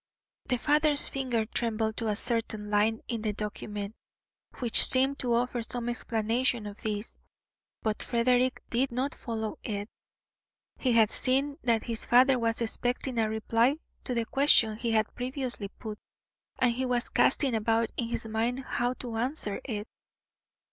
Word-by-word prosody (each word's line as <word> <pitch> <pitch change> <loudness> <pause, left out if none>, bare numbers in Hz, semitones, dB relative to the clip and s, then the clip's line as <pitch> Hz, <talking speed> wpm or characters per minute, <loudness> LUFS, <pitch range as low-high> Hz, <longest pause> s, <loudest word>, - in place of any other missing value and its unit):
The 250 - +1
father's 295 +2 +4
finger 250 -5 -1
trembled 220 -1 -1
to 230 - -1
a 210 - 0
certain 220 -1 -2
line 215 +2 +2
in 230 -2 -3
the 215 -1 -1
document, 210 0 -5 0.6
which 240 -3 +5
seemed 270 +2 +4
to 240 -2 +2
offer 245 0 0
some 240 +1 -2
explanation 235 0 0
of 205 0 -9
this; 210 0 -4 0.6
but 215 -1 -1
Frederick 250 +2 +1
did 250 +2 +1
not 260 +3 -1
follow 220 -2 -5
it. 205 -1 -4 0.9
He 255 -3 +1
had 225 -2 +5
seen 275 +3 0
that 230 -3 +1
his 230 -2 -3
father 255 +1 +5
was 230 0 0
expecting 245 +2 0
a 220 -1 +1
reply 230 +5 +1 0.3
to 250 - -1
the 230 -1 0
question 255 -5 +4
he 230 +2 -3
had 220 -1 +1
previously 250 -4 -3
put, 210 +1 -9 0.6
and 250 -2 +3
he 255 +2 -2
was 245 -1 0
casting 270 -1 +3
about 225 +1 +1
in 235 - -2
his 230 -1 -3
mind 230 +4 -1
how 245 -1 -1
to 235 -3 -6
answer 240 -4 -2
it. 215 -4 -4
235 Hz, 155 wpm, -28 LUFS, 220-250 Hz, 0.9 s, which